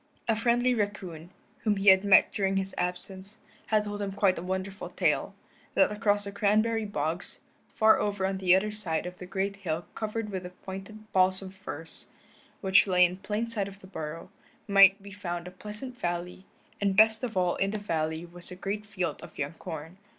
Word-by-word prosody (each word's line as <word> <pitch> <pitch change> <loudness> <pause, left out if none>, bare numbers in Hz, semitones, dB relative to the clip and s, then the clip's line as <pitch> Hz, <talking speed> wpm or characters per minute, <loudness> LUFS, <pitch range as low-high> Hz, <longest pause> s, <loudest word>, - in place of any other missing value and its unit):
A 225 - +3
friendly 240 +2 +2
raccoon, 190 -7 -4 0.3
whom 215 -2 +1
he 195 0 +4
had 190 0 +7
met 200 -2 +6
during 195 -1 0
his 195 0 -2
absence, 190 +3 -2 0.3
had 215 -1 +2
told 205 0 -5
him 200 -1 -2
quite 195 -2 +3
a - - -5
wonderful 190 +2 -4
tale: - - 0 0.4
that 290 - +4
across 205 -1 +1
the 200 - -6
cranberry 215 +2 +1
bogs, 165 -2 +3 0.3
far 220 0 +4
over 205 -2 -1
on 190 0 -1
the 185 -1 +5
other 210 +3 +1
side 180 -7 -3
of 180 0 -7
the 180 - -8
great 195 +1 -2
hill 170 -3 -3
covered 215 0 -3
with 190 -2 -3
the 180 - -7
pointed 195 +4 -10
balsam 185 0 +2
firs, 175 -4 -3 0.5
which 190 0 +4
lay 180 -1 +5
in 180 +1 -2
plain 210 +4 -2
sight 215 -4 -2
of 200 0 -10
the 190 - -14
burrow, 165 -1 -7 0.4
might 195 -1 +6
be 200 - -10
found 175 -3 -5
a - - -8
pleasant 210 +7 -8
valley, 175 +2 -4 0.4
and 195 -1 +1
best 220 +1 +5
of 230 -6 -3
all 180 -1 +2
in 195 - +1
the 215 - -2
valley 160 -4 -2
was 175 0 -11
a 180 - -8
great 205 +3 -4
field 185 -7 -3
of - - -12
young 145 +2 -3
corn. 160 +2 -8
195 Hz, 195 wpm, -28 LUFS, 180-210 Hz, 0.5 s, had